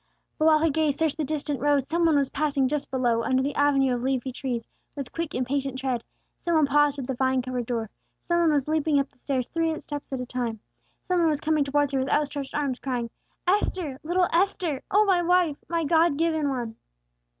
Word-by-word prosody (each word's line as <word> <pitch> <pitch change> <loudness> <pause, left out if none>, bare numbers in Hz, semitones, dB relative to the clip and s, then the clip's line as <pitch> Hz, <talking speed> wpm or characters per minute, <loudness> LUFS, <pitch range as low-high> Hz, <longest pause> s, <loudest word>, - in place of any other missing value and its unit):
But 310 - +2
while 315 -1 +6
her 320 0 +2
gaze 300 -1 +1
searched 320 -2 0
the 315 - -1
distant 290 -1 -2
road, 290 -1 +2
some 335 +5 +1
one 320 - +3
was 275 -1 +1
passing 280 -2 +1
just 295 +1 -2
below, 245 -3 +1
under 260 +2 +1
the 285 +1 -1
avenue 275 -2 +3
of 245 - -2
leafy 260 0 -1
trees, 245 -3 -4 0.3
with 275 -4 -6
quick 330 -2 -4
impatient 260 +1 -1
tread; 255 -3 -2 0.4
some 340 -1 +1
one 310 -2 +5
paused 290 0 +3
at 270 - -4
the 265 - -2
vine 260 0 +1
covered 250 -2 -3
door; 225 -3 -2 0.3
some 345 0 +2
one 335 -2 +4
was 285 -2 +1
leaping 310 -1 +2
up 275 - -2
the 275 - -33
stairs 255 -3 -2
three 325 -1 -1
steps 290 -2 -7
at 265 - -2
a 250 - -3
time; 240 -3 -3 0.5
some 365 -2 +2
one 335 -1 +4
was 300 -2 0
coming 310 -1 +1
towards 285 0 +1
her 270 - 0
with 260 - -1
out 300 - +3
stretched 280 -1 -6
arms, 280 -4 -1
crying, 245 -3 -3 0.3
"Esther, 360 -7 0
little 355 +3 +2
Esther, 340 -5 +1
O 420 +2 +4
my 375 -3 +3
wife! 350 -4 +2
My 335 -1 0
God 320 -1 +3
given 315 -2 +1
one!" 240 -4 -4
285 Hz, 225 wpm, -26 LUFS, 260-315 Hz, 0.5 s, while